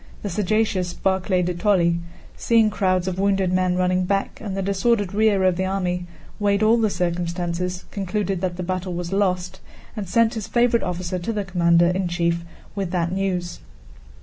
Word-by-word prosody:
The 205 Hz, -, -3 dB
sagacious 195 Hz, -2 st, 0 dB
Barclay 190 Hz, -1 st, +1 dB
de 180 Hz, +1 st, -1 dB
Tolly, 175 Hz, -3 st, +2 dB, 0.4 s
seeing 225 Hz, -2 st, +3 dB
crowds 185 Hz, -3 st, +1 dB
of 185 Hz, 0 st, -2 dB
wounded 195 Hz, -2 st, +1 dB
men 185 Hz, -1 st, +2 dB
running 185 Hz, 0 st, +1 dB
back 195 Hz, +1 st, -2 dB
and 195 Hz, -3 st, -4 dB
the 195 Hz, -, -1 dB
disordered 200 Hz, +1 st, +1 dB
rear 210 Hz, -2 st, +3 dB
of 185 Hz, -2 st, +3 dB
the 190 Hz, -, 0 dB
army, 180 Hz, -2 st, -2 dB, 0.3 s
weighed 200 Hz, 0 st, +2 dB
all 225 Hz, +2 st, +5 dB
the 220 Hz, -2 st, +2 dB
circumstances, 175 Hz, 0 st, -2 dB
concluded 195 Hz, -1 st, -2 dB
that 180 Hz, -2 st, -2 dB
the 180 Hz, -, -3 dB
battle 185 Hz, 0 st, -3 dB
was 175 Hz, +1 st, -4 dB
lost, 185 Hz, -2 st, 0 dB, 0.4 s
and 205 Hz, -5 st, -5 dB
sent 230 Hz, +3 st, +3 dB
his 220 Hz, -4 st, -5 dB
favorite 240 Hz, -1 st, +2 dB
officer 180 Hz, 0 st, -3 dB
to 175 Hz, +6 st, -3 dB
the 210 Hz, -3 st, -2 dB
commander 170 Hz, -2 st, +3 dB
in 185 Hz, 0 st, 0 dB
chief 170 Hz, -1 st, 0 dB, 0.3 s
with 195 Hz, -3 st, -3 dB
that 175 Hz, -1 st, -1 dB
news. 185 Hz, -2 st, -2 dB
185 Hz, 175 wpm, -23 LUFS, 180-200 Hz, 0.4 s, all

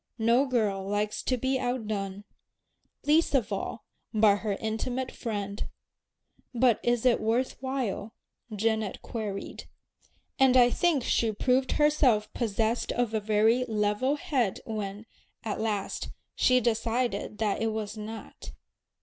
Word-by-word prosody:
No 235 Hz, +4 st, +3 dB
girl 210 Hz, -6 st, 0 dB
likes 210 Hz, +1 st, -1 dB
to 255 Hz, -, 0 dB
be 260 Hz, +2 st, 0 dB
outdone, 215 Hz, -6 st, -3 dB, 0.8 s
least 305 Hz, +1 st, +3 dB
of 225 Hz, -5 st, +1 dB
all 200 Hz, -, -4 dB, 0.3 s
by 215 Hz, -2 st, +5 dB
her 210 Hz, -1 st, -2 dB
intimate 235 Hz, +5 st, -3 dB
friend. 205 Hz, -3 st, -4 dB, 0.9 s
"But 240 Hz, -2 st, +4 dB
is 240 Hz, 0 st, +1 dB
it 250 Hz, -, +4 dB
worth 230 Hz, +4 st, 0 dB
while?" 255 Hz, -5 st, -3 dB, 0.4 s
Janet 220 Hz, -1 st, -1 dB
queried. 210 Hz, -4 st, -5 dB, 0.7 s
And 260 Hz, -1 st, +6 dB
I 245 Hz, -1 st, +6 dB
think 330 Hz, -5 st, +2 dB
she 230 Hz, -1 st, +2 dB
proved 255 Hz, +4 st, +1 dB
herself 275 Hz, -8 st, +3 dB
possessed 225 Hz, 0 st, 0 dB
of 240 Hz, -2 st, 0 dB
a 220 Hz, -, +2 dB
very 220 Hz, +4 st, +3 dB
"level 215 Hz, +5 st, +1 dB
head" 270 Hz, -, -1 dB
when, 210 Hz, -1 st, -5 dB, 0.4 s
at 215 Hz, -1 st, -3 dB
last, 210 Hz, -3 st, -2 dB, 0.2 s
she 255 Hz, 0 st, +4 dB
decided 230 Hz, -2 st, -1 dB
that 210 Hz, -2 st, 0 dB
it 225 Hz, -, +1 dB
was 215 Hz, -1 st, -4 dB
not. 220 Hz, +1 st, -8 dB
225 Hz, 130 wpm, -28 LUFS, 210-255 Hz, 0.9 s, And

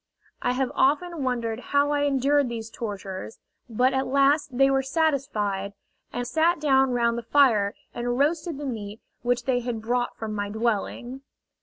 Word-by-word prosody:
I 245 Hz, -, +1 dB
have 260 Hz, 0 st, -1 dB
often 305 Hz, +3 st, +1 dB
wondered 235 Hz, -3 st, -1 dB
how 285 Hz, +2 st, +1 dB
I 290 Hz, 0 st, +1 dB
endured 280 Hz, 0 st, +2 dB
these 225 Hz, -1 st, -6 dB
tortures; 200 Hz, -2 st, -6 dB, 0.3 s
but 250 Hz, +4 st, +2 dB
at 265 Hz, 0 st, 0 dB
last 280 Hz, 0 st, +2 dB
they 270 Hz, +1 st, +6 dB
were 270 Hz, 0 st, +2 dB
satisfied, 265 Hz, -, -1 dB, 0.4 s
and 245 Hz, -, -3 dB
sat 325 Hz, +5 st, +2 dB
down 270 Hz, -3 st, +3 dB
round 235 Hz, -1 st, +1 dB
the -, -, -6 dB
fire 230 Hz, -5 st, +3 dB, 0.2 s
and 240 Hz, 0 st, -2 dB
roasted 310 Hz, +2 st, 0 dB
the 290 Hz, -, -5 dB
meat 215 Hz, -4 st, -5 dB, 0.2 s
which 245 Hz, 0 st, 0 dB
they 250 Hz, -1 st, +2 dB
had 240 Hz, -2 st, -3 dB
brought 245 Hz, +2 st, -1 dB
from 220 Hz, -1 st, -4 dB
my 205 Hz, -1 st, -3 dB
dwelling! 235 Hz, +4 st, -2 dB
250 Hz, 165 wpm, -25 LUFS, 230-280 Hz, 0.4 s, they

